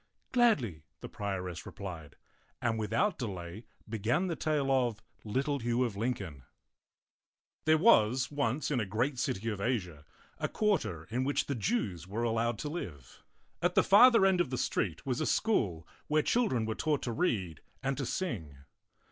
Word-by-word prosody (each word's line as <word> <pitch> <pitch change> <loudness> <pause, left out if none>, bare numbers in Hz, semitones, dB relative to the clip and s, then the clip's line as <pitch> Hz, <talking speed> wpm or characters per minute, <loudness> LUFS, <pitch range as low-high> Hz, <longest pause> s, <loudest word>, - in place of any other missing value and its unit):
" - - -45
Gladly," 150 - +2 0.2
the - - -6
prioress 95 -4 -4
replied, 85 -7 -8 0.4
and 115 -2 0
without 115 - 0
delay 95 -2 -5 0.2
began 115 - 0
the 175 -3 -2
tale 150 -3 0
of 120 -5 +1 0.2
LITTLE 135 +7 -1
HUGH 120 +1 +1
OF 115 -5 -2
LINCOLN 100 - -3 1.2
THERE 155 0 +5
was 130 - +4
once 145 +1 -1
in 135 - +1
a 110 - 0
great 120 +6 -1
city 110 -2 -2
of 105 -3 -4
Asia 90 - -2 0.4
a - - 0
quar 210 -2 +2
ter 80 -3 -6
in 125 +3 0
which 140 +2 0
the 140 - -2
Jews 105 - -1
were 110 +5 -3
allowed 115 0 0
to 150 - -4
live. 80 - -7 0.4
At 175 +1 +1
the - - +5
farther 230 +1 +7
end 190 -2 +4
of 175 - -1
the 130 - -2
street 95 - -1
was 130 +1 -1
a - - 0
school 95 - +1 0.2
where 155 0 +2
child 245 -1 +2
ren 120 -4 0
were 110 - -1
taught 150 +4 -1
to 120 - -2
read 105 - -1 0.2
and 135 0 0
to 135 - -1
sing. 95 - -3
120 Hz, 175 wpm, -31 LUFS, 100-150 Hz, 1.2 s, farther